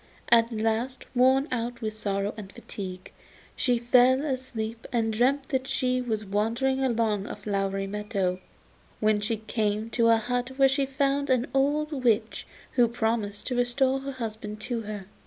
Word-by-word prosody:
At 230 0 +5
last, 225 +4 -1
worn 260 +3 +4
out 240 -1 -2
with 215 -1 -2
sorrow 200 -1 -2
and 205 -3 -9
fatigue, 185 -3 -8 0.4
she 250 -4 +2
fell 250 +3 +4
asleep 235 -5 -4
and 225 -2 +1
dreamt 265 +5 +1
that 265 -1 -1
she 255 -1 0
was 220 -3 -2
wandering 230 +7 0
along 225 -5 +1
a - - -5
flowery 195 -1 -2
meadow, 195 -2 -2 0.6
when 215 -1 +2
she 220 +2 -1
came 215 0 -2
to 230 0 +3
a 230 0 +6
hut 245 +3 -2
where 270 -1 +6
she 270 0 +1
found 280 +1 0
an 255 -1 +3
old 290 +3 +1
witch, 225 -2 +1 0.2
who 245 -2 +4
promised 220 -3 -2
to 250 - -2
restore 260 +2 +2
her 275 0 -5
husband 220 -3 -5
to 235 0 -2
her. 210 -2 -6
230 Hz, 160 wpm, -27 LUFS, 215-260 Hz, 0.6 s, a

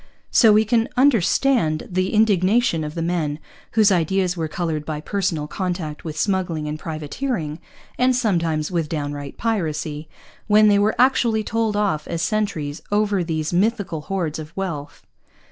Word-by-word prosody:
So 225 -3 +6
we 215 +1 +5
can 225 +1 +1
understand 240 - +2
the 185 +1 0
indignation 210 -3 +3
of 150 0 -6
men 165 -3 -1 0.4
whose 215 -2 +5
ideas 180 +1 +1
were 165 -2 -2
coloured 155 -1 -3
by 150 -1 -4
personal 175 -3 -2
contact 175 -3 -4
with 155 -2 -6
smuggling 175 -4 -1
and 150 +1 -4
privateering, 160 - -4 0.4
and 255 0 +3
sometimes 170 -9 0
with 165 -4 -1
downright 145 -2 -4
piracy, 160 -8 -2 0.4
when 215 0 +6
they 200 -1 +4
were 210 +2 +2
actually 240 -4 +3
told 225 -1 -1
off 200 -8 0
as 170 0 -2
sentries 165 -7 -2
over 205 -3 +1
these 160 -1 -2
mythical 195 -4 0
hoards 165 -3 -3
of 155 +3 -10
wealth. 165 -7 -5
180 Hz, 145 wpm, -22 LUFS, 155-215 Hz, 0.4 s, So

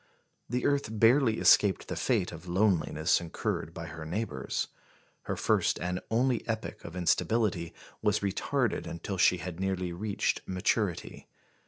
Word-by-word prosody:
The 125 +2 -1
earth 140 -6 +1
barely 115 0 +5
escaped 100 -3 +4
the - - -3
fate 90 - 0
of 85 +1 -10
loneliness 90 -4 +2
incurred 80 -1 -3
by 85 0 -7
her 80 0 -8
neighbours. 80 -4 -3 0.6
Her - - -2
first - - +2
and 90 +1 -2
only 120 +1 +1
epoch 110 -1 -4
of 85 - -8
instability 90 0 +1 0.3
was 105 -1 +2
retarded 100 -2 -1
until 95 +3 -5
she 90 - +5
had 90 -1 -6
nearly 95 -2 -1
reached 100 +3 -1
maturity. 90 -1 -1
95 Hz, 140 wpm, -30 LUFS, 85-110 Hz, 0.6 s, barely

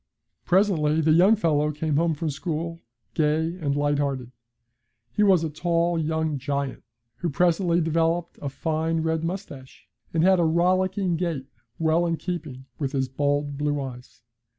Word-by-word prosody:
Presently 175 -5 +3
the 160 0 +3
young 185 +7 +6
fellow 150 -6 +1
came 150 0 -2
home 165 0 +2
from 155 +1 -2
school, 165 +3 -4 0.3
gay 160 +2 +1
and 145 -4 -1
light 145 0 +1
hearted. 135 -4 -2 0.8
He 210 - -1
was 190 -5 +5
a 160 - -1
tall 170 +2 0
young 160 -2 -1
giant, 140 0 -3 0.4
who 175 - -2
presently 175 +2 +2
developed 165 +1 0
a 140 - -3
fine 160 +3 -1
red 160 0 -1
moustache, 165 -7 -7 0.2
and 165 -1 +1
had 190 0 +5
a - - +3
rollicking 180 +2 +1
gait 165 -6 -2 0.3
well 165 +2 +2
in 165 -1 0
keeping 155 -8 -5
with 140 -2 -2
his 135 -2 0
bold 145 +1 -1
blue 145 0 0
eyes. 125 -3 -8
160 Hz, 155 wpm, -25 LUFS, 145-170 Hz, 0.8 s, young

